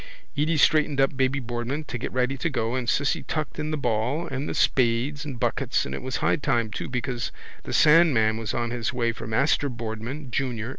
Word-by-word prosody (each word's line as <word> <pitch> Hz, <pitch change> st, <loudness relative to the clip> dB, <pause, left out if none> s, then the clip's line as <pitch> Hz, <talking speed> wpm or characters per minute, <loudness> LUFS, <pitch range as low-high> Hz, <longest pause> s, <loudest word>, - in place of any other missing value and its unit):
Edy 155 Hz, +2 st, +1 dB
straightened 150 Hz, -1 st, +3 dB
up 135 Hz, +1 st, +3 dB
baby 130 Hz, +1 st, +1 dB
Boardman 120 Hz, +4 st, -3 dB
to 145 Hz, -, -7 dB
get -, -, -4 dB
ready 130 Hz, +1 st, 0 dB
to 135 Hz, +5 st, -1 dB
go 120 Hz, -4 st, -1 dB
and 125 Hz, -2 st, -1 dB
Cissy 145 Hz, -1 st, +1 dB
tucked 155 Hz, -1 st, -4 dB
in 155 Hz, 0 st, -2 dB
the 155 Hz, -, -1 dB
ball 130 Hz, +6 st, 0 dB
and 135 Hz, -2 st, -4 dB
the -, -, -3 dB
spades 130 Hz, +4 st, +1 dB
and 135 Hz, -5 st, -6 dB
buckets -, -, 0 dB
and 65 Hz, -, -5 dB
it -, -, -4 dB
was 130 Hz, 0 st, -4 dB
high -, -, +2 dB
time 120 Hz, -7 st, 0 dB
too -, -, -5 dB
because 125 Hz, -1 st, -2 dB, 0.3 s
the -, -, -5 dB
sandman 150 Hz, -9 st, +5 dB
was 110 Hz, -2 st, -3 dB
on 120 Hz, 0 st, -1 dB
his 120 Hz, -2 st, -2 dB
way 120 Hz, -2 st, 0 dB
for 115 Hz, -, -8 dB
Master 140 Hz, +5 st, +2 dB
Boardman 120 Hz, +4 st, -6 dB
junior. 120 Hz, -3 st, -2 dB
130 Hz, 210 wpm, -25 LUFS, 115-145 Hz, 0.3 s, sandman